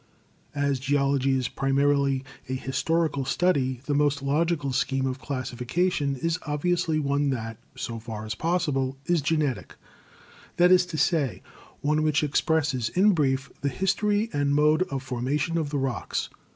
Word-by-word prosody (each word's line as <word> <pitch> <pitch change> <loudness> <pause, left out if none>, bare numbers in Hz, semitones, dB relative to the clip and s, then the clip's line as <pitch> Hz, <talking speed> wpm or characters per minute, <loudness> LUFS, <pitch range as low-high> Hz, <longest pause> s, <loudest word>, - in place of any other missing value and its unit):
As 140 -2 0
geology 135 0 +1
is 130 -2 -1
primarily 140 0 +1 0.3
a - - -1
historical 145 +3 0
study, 130 -4 +1
the 145 - -1
most 145 -1 +1
logical 145 -1 0
scheme 135 +1 0
of 130 0 -2
classification 140 +4 -1
is 165 +6 -1
obviously 165 +2 0
one 140 -1 +1
that, 115 -3 -4 0.2
so 115 -1 -4
far 110 -1 -7
as 110 - -3
possible, 140 -3 -1
is 175 -3 +2
genetic; 145 -3 -1 0.8
that 180 +1 +5
is 180 -1 +5
to 170 -3 -5
say, 150 - +1 0.4
one 150 +1 +1
which 155 0 +2
ex 145 -1 +1
presses 145 -7 0
in 195 - +4
brief 135 -4 0
the 140 - 0
history 205 - 0
and 145 0 +1
mode 150 +2 +4
of 135 -1 -3
formation 135 +6 -1
of 160 -3 0
the 145 - -2
rocks. 130 -4 -2
145 Hz, 150 wpm, -26 LUFS, 135-160 Hz, 0.8 s, that